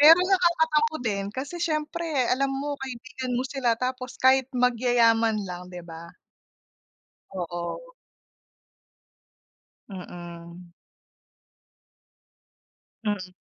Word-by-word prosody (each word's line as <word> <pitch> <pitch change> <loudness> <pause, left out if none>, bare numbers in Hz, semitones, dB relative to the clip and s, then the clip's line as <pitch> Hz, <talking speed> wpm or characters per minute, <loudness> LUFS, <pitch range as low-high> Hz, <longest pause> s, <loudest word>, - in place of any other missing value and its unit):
Pero 310 +3 +10
nakakatampo 320 -5 +3
din 200 -3 0
kasi 275 +8 -5
siyempre 310 -4 0
alam 275 +2 +2
mo, 285 +2 -2
kaibigan 255 -1 -4
mo 255 - 0
sila, 255 -4 0
tapos 255 +1 -3
kahit 260 0 +4
magyaya 245 -1 +4
man 225 -1 +1
lang, 180 -1 -7
'di 180 -1 -8
ba. 170 0 -10 1.2
Oo. 175 - -4 2.1
Mm. 175 -1 -9 2.3
Mm. 195 -3 -2
250 Hz, 90 wpm, -26 LUFS, 185-285 Hz, 2.3 s, Pero